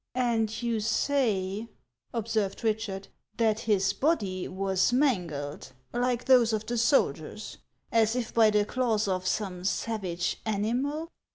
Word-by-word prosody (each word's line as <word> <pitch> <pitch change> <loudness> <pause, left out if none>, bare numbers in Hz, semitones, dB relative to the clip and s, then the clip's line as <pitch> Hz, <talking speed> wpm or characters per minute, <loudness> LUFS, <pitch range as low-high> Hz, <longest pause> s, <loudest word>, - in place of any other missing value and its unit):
And 230 -3 0
you 230 -2 0
say," 215 -3 0 0.4
observed 220 -3 -2
Eichard, 215 -3 -1 0.2
" 210 - -41
that 220 -2 +2
his 200 -4 +1
body 200 - 0
was 190 +2 +1
mangled, 175 - -1 0.2
like 245 0 0
those 245 -4 +5
of 215 0 -1
the 240 0 -1
soldiers, 235 +5 0 0.3
as 225 0 +3
if 245 -3 -3
by 225 -2 +6
the 210 -1 +2
claws 225 -3 0
of 185 -1 -1
some 185 -3 -2
savage 185 -4 -2
animal 250 +10 -1
220 Hz, 130 wpm, -28 LUFS, 195-240 Hz, 0.4 s, by